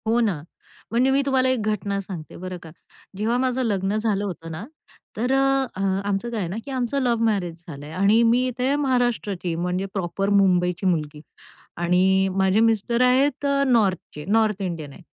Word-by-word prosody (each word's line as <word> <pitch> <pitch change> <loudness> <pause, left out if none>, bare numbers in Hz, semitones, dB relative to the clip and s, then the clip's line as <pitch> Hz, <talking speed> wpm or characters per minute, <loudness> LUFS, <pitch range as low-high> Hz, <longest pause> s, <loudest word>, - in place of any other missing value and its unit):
हो 230 +2 +3
ना. 200 -10 0 0.5
म्हणजे 250 +3 +3
मी 275 +1 +3
तुम्हाला 260 -2 +2
एक 255 -3 0
घटना 200 -1 -2
सांगते, 180 -5 -8
बरं 185 +1 -6
का. 165 - -10 0.5
जेव्हा 225 +4 0
माझं 255 0 0
लग्न 200 -2 0
झालं 215 -2 0
होतं 165 -4 -6
ना, 160 +6 -6 0.5
तर 245 +4 0
अ, 270 0 +2
अ, 195 - -4 0.2
आमचं 205 +3 -1
काय 230 -2 -3
आहे 185 - -2
ना, 185 - -4
की 280 - -7
आमचं 260 +1 -1
लव्ह 235 -3 +1
मॅरेज 175 -6 -1
झालंय. 145 -1 -9
आणि 200 +6 +3
मी 240 +2 +3
इथे 255 +3 0
महाराष्ट्राची, 240 -10 0
म्हणजे 180 +3 -2
प्रॉपर 195 +1 -2
मुंबईची 185 -2 +2
मुलगी 155 -4 -1 0.6
आणि 185 +2 +3
माझे 190 +2 +3
मिस्टर 225 +1 +2
आहेत 265 +3 +3 0.2
नॉर्थचे, 195 - 0
नॉर्थ 215 0 +1
इंडियन 165 -6 -4
आहे. 185 - -14
205 Hz, 175 wpm, -23 LUFS, 180-240 Hz, 0.6 s, हो